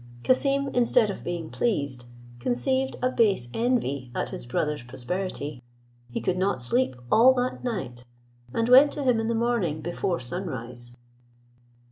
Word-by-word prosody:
Cassim, 275 +1 +2
instead 240 -4 +3
of - - -8
being 170 -2 -4
pleased, 140 - -1 0.3
conceived 260 - 0
a 255 - +2
base 200 - +2
envy 225 - 0
at - - -1
his - - -7
brother's 150 +3 -1
prosperity; 140 +3 -5 0.5
he 120 - -3
could 185 0 -1
not 190 -6 +1
sleep 130 +2 +1 0.2
all 255 +4 +7
that 250 0 -2
night, 130 - -4 0.4
and 230 - 0
went 265 +4 +8
to 290 - -4
him 250 -4 +3
in 225 - -1
the 230 - 0
morning 225 -10 0
before 175 +2 -2
sun 175 +10 -3
rise. 120 -3 -6
185 Hz, 150 wpm, -26 LUFS, -, 0.5 s, went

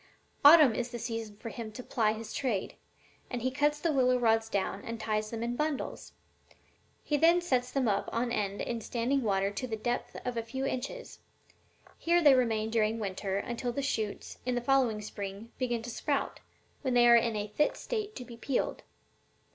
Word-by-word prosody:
Autumn 295 -4 +9
is 245 +2 -2
the 240 - -5
season 225 -2 -5
for 230 - -7
him 225 -2 -6
to 250 +3 -8
ply 215 -3 +1
his 220 0 -7
trade, 240 -9 -1 0.6
and 240 -2 -4
he 260 - +1
cuts 295 +3 +1
the 335 0 +1
willow 255 -3 +3
rods 225 -2 +2
down 200 -1 -2
and 230 0 -5
ties 215 -1 -1
them 230 0 -4
in 240 +1 -2
bundles. 300 0 -3 0.9
He 295 - +1
then 335 +4 +5
sets 255 -8 0
them 260 -2 0
up 200 -1 0
on 235 +1 -1
end 205 -3 -1
in 235 -1 -3
standing 245 +5 0
water 195 -3 +1
to 255 +5 -4
the 225 - -2
depth 240 +3 -3
of 250 -1 -2
a - - +1
few 265 +4 -4
inches. 275 - -4 0.8
Here 340 +1 +3
they 290 -2 +8
remain 225 -4 +1
during 220 -1 +2
the - - -6
winter, 195 -1 -2
until 240 +4 -3
the 280 +3 -3
shoots, 220 -6 -3
in 250 0 -1
the - - +1
following 240 -4 +2
spring, 205 +1 -7
begin 240 -3 -1
to 240 - -5
sprout, - - -2 0.4
when 260 -3 0
they 240 0 +6
are 235 - +8
in 230 -1 +3
a 210 0 -3
fit 295 +8 +1
state 430 -3 -4
to 250 - -7
be 235 -2 -11
peeled. 255 +2 -1
235 Hz, 200 wpm, -30 LUFS, 220-260 Hz, 0.9 s, Autumn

